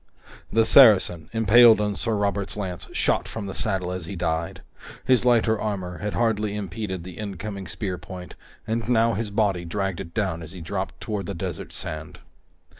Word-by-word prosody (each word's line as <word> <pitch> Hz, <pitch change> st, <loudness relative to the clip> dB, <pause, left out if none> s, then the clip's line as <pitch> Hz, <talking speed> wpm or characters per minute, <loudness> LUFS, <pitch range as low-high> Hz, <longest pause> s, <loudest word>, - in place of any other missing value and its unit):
The 115 Hz, 0 st, +4 dB
Saracen, 105 Hz, -, +6 dB
impaled 115 Hz, +1 st, +6 dB
on 105 Hz, -1 st, 0 dB
Sir 115 Hz, +1 st, -1 dB
Robert's 100 Hz, -1 st, -1 dB
lance, 95 Hz, -4 st, -4 dB
shot -, -, +1 dB
from 110 Hz, -3 st, -5 dB
the 95 Hz, -, -5 dB
saddle 95 Hz, -4 st, -2 dB
as 90 Hz, -3 st, -5 dB
he 100 Hz, -, -5 dB
died. 85 Hz, -1 st, -2 dB, 0.4 s
His 130 Hz, -2 st, +3 dB
lighter 115 Hz, -3 st, +3 dB
armor 95 Hz, -4 st, -3 dB
had 105 Hz, 0 st, -3 dB
hardly 105 Hz, -3 st, 0 dB
impeded 95 Hz, -2 st, -4 dB
the 90 Hz, +1 st, -10 dB
incoming 100 Hz, -1 st, -5 dB
spear 90 Hz, +1 st, -4 dB
point, 90 Hz, +2 st, -9 dB, 0.3 s
and 115 Hz, +1 st, -2 dB
now 115 Hz, -1 st, +3 dB
his 110 Hz, +1 st, -2 dB
body 100 Hz, -4 st, +1 dB
dragged 95 Hz, +1 st, -2 dB
it 85 Hz, -, -8 dB
down 95 Hz, -6 st, -1 dB
as 80 Hz, +1 st, -10 dB
he 90 Hz, -, -9 dB
dropped 95 Hz, +3 st, -4 dB
toward 105 Hz, -5 st, -3 dB
the 100 Hz, -, -4 dB
desert 90 Hz, -1 st, -5 dB
sand. 80 Hz, 0 st, -7 dB
100 Hz, 180 wpm, -24 LUFS, 90-110 Hz, 0.4 s, Saracen